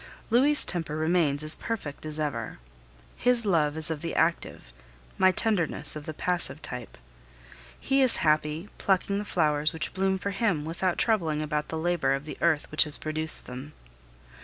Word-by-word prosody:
Louis' 280 Hz, +5 st, +3 dB
temper 165 Hz, -4 st, -3 dB
remains 155 Hz, -3 st, 0 dB
as 155 Hz, +1 st, +6 dB
perfect 155 Hz, -10 st, -6 dB
as 155 Hz, 0 st, -4 dB
ever; 125 Hz, -7 st, -4 dB, 0.6 s
his 245 Hz, -1 st, +2 dB
love 155 Hz, -6 st, +1 dB
is 160 Hz, +1 st, +5 dB
of 155 Hz, -2 st, -5 dB
the 165 Hz, -, -5 dB
active, 160 Hz, -, -2 dB, 0.5 s
my 185 Hz, -, +5 dB
tenderness 185 Hz, -7 st, +3 dB
of 150 Hz, -1 st, -9 dB
the 155 Hz, -, -5 dB
passive, 180 Hz, -2 st, -1 dB
type. 125 Hz, -2 st, -8 dB, 0.8 s
He 270 Hz, 0 st, +1 dB
is 260 Hz, -2 st, +4 dB
happy, 155 Hz, +3 st, 0 dB
plucking 200 Hz, +1 st, 0 dB
the -, -, -4 dB
flowers 150 Hz, -5 st, 0 dB
which 160 Hz, -1 st, -5 dB
bloom 190 Hz, 0 st, 0 dB
for 200 Hz, +2 st, -4 dB
him, 195 Hz, -7 st, -1 dB
without 175 Hz, +2 st, -2 dB
troubling 165 Hz, -9 st, 0 dB
about 150 Hz, 0 st, -3 dB
the 160 Hz, -, -5 dB
labor 160 Hz, -5 st, 0 dB
of 135 Hz, +2 st, -7 dB
the 155 Hz, -, -9 dB
earth 160 Hz, -3 st, +1 dB
which 155 Hz, -, +2 dB
has 150 Hz, -, +3 dB
produced 155 Hz, +1 st, +4 dB
them. 130 Hz, +4 st, -9 dB
160 Hz, 170 wpm, -26 LUFS, 150-190 Hz, 0.8 s, as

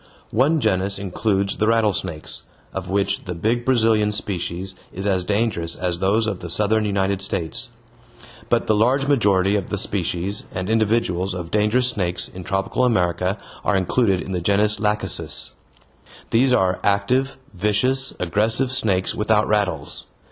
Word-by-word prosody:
One 140 Hz, +8 st, +3 dB
genus 100 Hz, -4 st, 0 dB
includes 100 Hz, +1 st, -1 dB
the 110 Hz, -, +1 dB
rattlesnakes, 105 Hz, -8 st, 0 dB, 0.3 s
of 95 Hz, -1 st, -5 dB
which 100 Hz, +1 st, 0 dB
the 90 Hz, -2 st, -4 dB
big 115 Hz, +7 st, 0 dB
Brazilian 110 Hz, -4 st, +3 dB
species 95 Hz, -2 st, -3 dB, 0.2 s
is 95 Hz, +2 st, -6 dB
as 95 Hz, -3 st, +1 dB
dangerous 100 Hz, -5 st, -1 dB
as 90 Hz, -2 st, -2 dB
those 100 Hz, +4 st, +2 dB
of 100 Hz, -5 st, -2 dB
the 85 Hz, -, -7 dB
southern 105 Hz, +4 st, +1 dB
United 100 Hz, -1 st, 0 dB
States. 85 Hz, -5 st, -3 dB, 0.8 s
But -, -, +2 dB
the 110 Hz, -, +2 dB
large 125 Hz, +6 st, +2 dB
majority 100 Hz, -8 st, +3 dB
of 100 Hz, -3 st, -2 dB
the 100 Hz, -, -2 dB
species 95 Hz, 0 st, -2 dB
and 95 Hz, +3 st, -3 dB
individuals 105 Hz, -5 st, +1 dB
of 85 Hz, -2 st, -6 dB
dangerous 110 Hz, +4 st, +3 dB
snakes 90 Hz, -6 st, -2 dB
in 90 Hz, -, -9 dB
tropical 95 Hz, +6 st, -1 dB
America 90 Hz, -4 st, +1 dB, 0.3 s
are 105 Hz, -, +2 dB
included 95 Hz, 0 st, +1 dB
in -, -, -7 dB
the 90 Hz, -2 st, -2 dB
genus 105 Hz, +3 st, +2 dB
lachecis. 105 Hz, 0 st, 0 dB, 0.8 s
These 125 Hz, +3 st, +4 dB
are 95 Hz, -7 st, +2 dB
active, 125 Hz, +7 st, +1 dB, 0.2 s
vicious, 105 Hz, +8 st, +1 dB
aggressive 110 Hz, +8 st, +1 dB
snakes 95 Hz, -7 st, +2 dB
without 105 Hz, 0 st, +2 dB
rattles. 95 Hz, -9 st, -1 dB
100 Hz, 150 wpm, -22 LUFS, 95-110 Hz, 0.8 s, These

